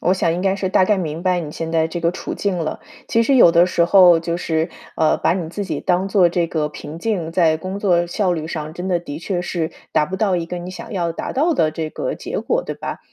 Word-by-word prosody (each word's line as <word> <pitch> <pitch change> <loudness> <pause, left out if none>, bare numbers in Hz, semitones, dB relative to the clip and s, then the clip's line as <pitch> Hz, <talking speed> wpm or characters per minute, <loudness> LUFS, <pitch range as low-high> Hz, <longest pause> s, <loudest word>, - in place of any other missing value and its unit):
我 180 - +2
想 165 -3 +1
应 175 - -2
该 190 0 +2
是 190 -1 -2
大 185 0 +4
概 210 +1 +2
明 165 -2 -4
白 180 -1 +1
你 155 -3 -6
现 165 +1 -4
在 160 -1 +2
这 170 +1 -4
个 170 0 +2
处 180 - -5
境 195 -3 -1
了。 160 -2 -3 0.3
其 230 - +3
实 270 +4 +2
有 205 -9 +8
的 170 0 +6
时 170 -1 +2
候 180 -2 +7
就 170 0 -2
是， 160 -2 -1 0.3
呃， 155 -1 +3
把 - - +1
你 175 -3 -3
自 200 +5 -4
己 160 -6 -3
当 180 +2 +1
做 190 -3 +4
这 170 0 0
个 155 -2 -1
瓶 150 +1 -9
颈， 175 -5 -2
在 165 -3 +3
工 185 +4 -5
作 175 -4 +2
效 185 +1 0
率 160 -2 -3
上 155 -1 -5
真 180 +1 -5
的 175 -2 +2
的 150 -3 -7
确 175 +1 -2
是 170 -2 -2 0.2
达 150 - +3
不 185 +5 -5
到 195 -3 +1
一 170 - -2
个 175 +1 -5
你 175 +1 -7
想 185 - -9
要 170 -3 -1
达 - - -5
到 315 +5 +2
的 155 - +2
这 155 0 -4
个 - - -3
结 - - -4
果， - - 0
对 - - -4
吧？ - - -6
175 Hz, 295 characters per minute, -20 LUFS, 165-190 Hz, 0.3 s, 有